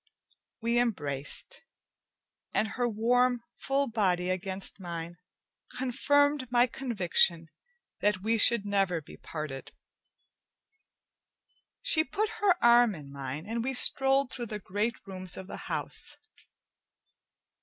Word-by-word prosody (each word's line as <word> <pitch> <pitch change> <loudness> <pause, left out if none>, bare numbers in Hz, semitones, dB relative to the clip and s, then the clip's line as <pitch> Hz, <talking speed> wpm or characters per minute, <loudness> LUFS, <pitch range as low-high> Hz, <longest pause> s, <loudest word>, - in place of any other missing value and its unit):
We 235 +1 +2
embraced, 145 - -2 0.9
and 220 - +1
her 245 +1 -1
warm 245 +2 +2 0.2
full 275 +1 0
body 185 -5 0
against 190 +2 -2
mine 170 -1 -6 0.6
confirmed 285 +1 +1
my 240 0 +5
conviction 180 -10 +2 0.5
that 200 -2 0
we 225 +1 +1
should 230 -1 +6
never 195 -4 +1
be 150 - -13
parted. 150 -4 -7 2.1
She 330 -11 +4
put 420 +5 -2
her 390 -3 +4
arm 235 -2 +6
in 140 -3 -11
mine, 140 +3 -6
and 230 +2 -3
we 265 +1 -2
strolled 270 +1 +2
through 240 -2 -5
the 210 - -5
great 210 +4 -2
rooms 185 -2 -3
of 190 - -7
the - - -8
house. - - -4
220 Hz, 115 wpm, -29 LUFS, 180-245 Hz, 2.1 s, should